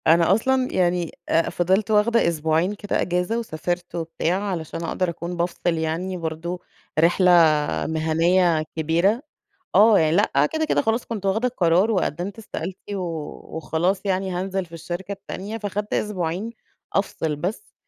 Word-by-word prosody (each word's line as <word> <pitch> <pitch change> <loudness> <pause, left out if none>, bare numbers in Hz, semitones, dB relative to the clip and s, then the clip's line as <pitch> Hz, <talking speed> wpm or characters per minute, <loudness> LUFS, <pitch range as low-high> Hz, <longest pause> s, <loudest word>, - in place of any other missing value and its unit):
أنا 170 +2 +5
أصلًا 260 +4 +2
يعني 175 -2 +1 0.2
آآ 165 +1 +2
فضلت 190 +4 +1
واخدة 220 +1 +4
أسبوعين 160 +3 +1
كده 205 0 -2
أجازة، 180 +6 0
وسافرت 175 -4 -4
و 170 - -1
بتاع، 165 +4 -1
علشان 170 -4 -4
أقدر 180 +2 -1
أكون 170 +1 -5
بافصل 175 +1 -1 0.2
يعني 165 +4 -2
برضه، 165 +2 -4 0.4
رحلة 175 +3 +4 0.6
مهنية 160 +1 +2
كبيرة. 170 - +2 0.5
آه، 210 +2 +7
يعني 160 +1 +3
لأ 150 -8 +3
كده، 315 0 0
كده 310 - +1
خلاص 230 -1 0
كنت 210 -4 -4
واخدة 220 +6 +2
القرار 185 -2 +2
وقدمت 185 0 -1
استقالتي 205 -2 -6
و 190 - -3 0.5
وخلاص 170 +4 0
يعني 190 0 0
هانزل 190 +1 -2
في 170 - -21
الشركة 175 +4 -5
التانية، 200 +2 -6
فاخدت 205 0 -3
أسبوعين 190 0 -2 0.4
أفصل 160 -6 -1
بس. 180 - -5
180 Hz, 145 wpm, -23 LUFS, 165-205 Hz, 0.6 s, آه